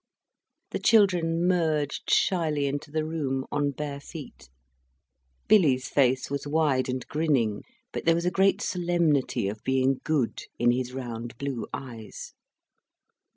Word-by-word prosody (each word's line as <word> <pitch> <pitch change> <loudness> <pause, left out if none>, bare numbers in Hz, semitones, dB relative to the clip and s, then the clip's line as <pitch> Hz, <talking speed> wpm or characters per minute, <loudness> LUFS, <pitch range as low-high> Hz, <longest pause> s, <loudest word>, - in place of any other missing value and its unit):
The - - -2
children 175 -6 +3
merged 160 -5 0
shyly 155 -6 +2
into 145 +2 -3
the 155 +1 -1
room, 135 -5 -2
on 145 0 +1
bare 140 0 -5
feet. 140 - -11 1.0
Billy's 145 -12 +4
face 130 -2 +2
was 140 0 -3
wide 145 -4 +1
and 130 -1 -3
grinning, 135 -9 0 0.3
but - - -5
there 165 0 +5
was 170 +1 -1
a 180 - +2
great 195 +2 +2
solemnity 165 - +1
of 105 +2 -5
being 130 0 +1
good 150 -7 0 0.2
in 120 0 +4
his 125 0 -2
round 120 -2 -6
blue 135 -3 -4
eyes. 115 -5 -8
145 Hz, 135 wpm, -27 LUFS, 130-165 Hz, 1.0 s, there